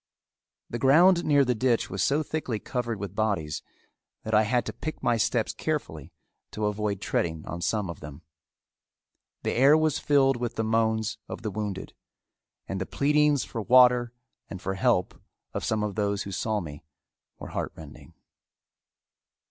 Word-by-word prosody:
The 120 - -5
ground 170 +7 +5
near 145 -2 +4
the 125 - +2
ditch 120 0 0
was 95 0 -2
so 140 - +2
thickly 150 -8 -3
covered 120 -1 -3
with 100 -2 -5
bodies 100 -9 -1 0.6
that 110 - -4
I 105 - +6
had 125 0 +1
to - - -5
pick 155 +2 -6
my 120 - +3
steps 115 +1 0
carefully 80 - -4 0.4
to 105 - -2
avoid 105 -1 -1
treading 80 -2 -2
on 85 +2 -6
some 105 +1 0
of 85 -3 -7
them. 75 -1 -10 1.2
The - - 0
air 140 +5 +6
was 155 -2 +1
filled 135 -3 +3
with 120 -1 -3
the 110 - -1
moans 110 0 0
of - - -7
the 110 - -2
wounded; 105 -2 -5 0.7
and 95 -1 -4
the 95 - -3
pleadings 150 -1 +2
for 115 - -5
water 125 +1 +5 0.4
and 95 - -7
for 95 0 -3
help 95 -3 0 0.3
of - - -3
some 110 -1 0
of 105 -1 -2
those 100 -1 -1
who 100 - -7
saw 105 +2 -1
me 75 -4 -9 0.5
were - - -9
heartrending. 80 -3 -7
110 Hz, 165 wpm, -27 LUFS, 100-130 Hz, 1.2 s, I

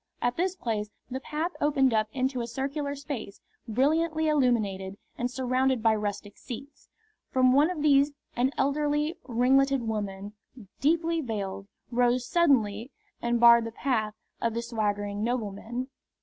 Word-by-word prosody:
At 245 0 0
this 365 +2 0
place 215 - -3 0.2
the 260 - -2
path 310 +5 -3
opened 275 -4 +3
up 215 -1 +2
into 260 0 -1
a 235 - -4
circular 280 +4 -3
space, 275 -8 -6 0.3
brilliantly 315 +7 +1
illuminated 215 -10 +1 0.2
and 245 0 -2
surrounded 255 -1 0
by 225 -1 +5
rustic 205 -1 -4
seats. 275 +4 -9 0.4
From 255 -1 +4
one 290 +5 +5
of 330 -5 -3
these 285 -1 +5 0.2
an 250 +2 +2
elderly, 295 +2 +1
ringleted 265 +2 +3
woman, 205 -2 -4 0.5
deeply 330 +3 +2
veiled, 200 -6 -4 0.2
rose 245 0 +2
suddenly 245 -9 +2 0.3
and 235 0 +1
barred 235 -1 +7
the 230 - -5
path 220 -4 -1 0.3
of 230 -1 0
the 235 - -2
swaggering 205 -3 -2
nobleman. 240 +1 -3
250 Hz, 140 wpm, -28 LUFS, 220-280 Hz, 0.5 s, barred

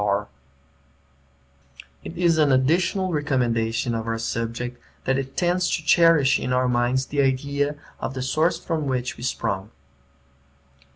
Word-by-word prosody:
[Footnote: 100 -1 +2
Wordsworth] 70 -3 -15 0.2
It 170 - -7
is 170 -2 +3
an 150 -2 +4
additional 175 +8 +2
recommendation 120 -5 0
of 115 0 -3
our 115 0 -1
subject, 115 +2 -4 0.2
that 135 0 +1
it 135 0 -6
tends 180 0 +1
to 160 - -7
cherish 165 -5 +5
in 125 - -3
our 125 0 +2
minds 125 +2 +1
the 145 +1 0
idea 140 +2 0 0.2
of 135 - -4
the 130 - -3
source 155 +6 +1
from 160 -4 -2
which 125 -1 -2
we - - -13
sprung. 105 -5 -2
130 Hz, 150 wpm, -23 LUFS, 115-150 Hz, 0.2 s, cherish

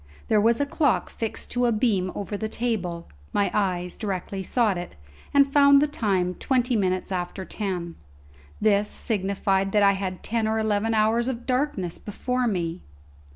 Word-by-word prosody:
There 215 -2 +4
was 230 +2 +3
a 285 - +2
clock 285 -2 +1
fixed 225 -1 -5
to 245 0 +2
a - - +2
beam 210 -5 +1
over 205 +1 -4
the 215 +1 -3
table; 190 -8 -2 0.3
my 205 - +1
eyes 180 -3 -1
directly 195 -1 -3
sought 215 +1 +1
it, 175 0 -6 0.4
and 280 -1 +4
found 280 -1 +7
the 290 - +4
time 200 - 0
twenty 250 +3 0
minutes 185 -2 0
after 185 +1 -3
ten. 180 -6 -4 0.7
This 210 -1 +3
signified 195 -1 0
that 210 -1 +4
I 200 - +6
had 190 -2 -4
ten 225 -1 0
or 220 0 0
eleven 220 +1 +1
hours 220 +3 +2
of 245 -2 -4
darkness 255 - -1
before 250 +4 -2
me! 175 -4 -2
210 Hz, 165 wpm, -25 LUFS, 190-235 Hz, 0.7 s, found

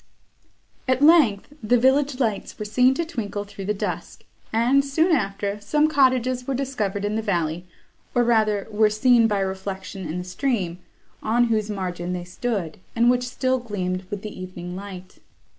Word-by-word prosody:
At 255 +2 +2
length, 295 -8 +5
the 240 +3 +3
village 265 +2 +2
lights 220 -6 -1
were 210 - -5
seen 250 +5 +3
to 335 - -1
twinkle 210 -10 -4
through 200 -1 -9
the 210 - 0
dusk, - - -5 0.3
and, 245 +5 +3
soon 315 +6 +2
after, 200 -3 -2
some 300 +8 +2
cottages 255 -4 +2
were 270 - 0
discovered 215 -7 -2
in 210 +1 -1
the 220 - 0
valley, 175 -4 -1 0.5
or 245 - +4
rather 215 -4 +2
were 215 0 +4
seen 230 +2 +4
by 205 -2 0
reflection 190 -1 -4
in 160 +3 -4
the 180 - -3
stream, 180 -3 -2 0.4
on 240 +2 +2
whose 215 -1 0
margin 180 -3 -3
they 180 -1 -4
stood, 185 -2 -3 0.2
and 235 +1 +5
which 250 0 0
still 260 +1 0
gleamed 185 -5 -3
with 205 -1 -5
the 210 -3 -7
evening 180 -1 -7
light. 185 -1 -9
215 Hz, 170 wpm, -23 LUFS, 190-250 Hz, 0.5 s, length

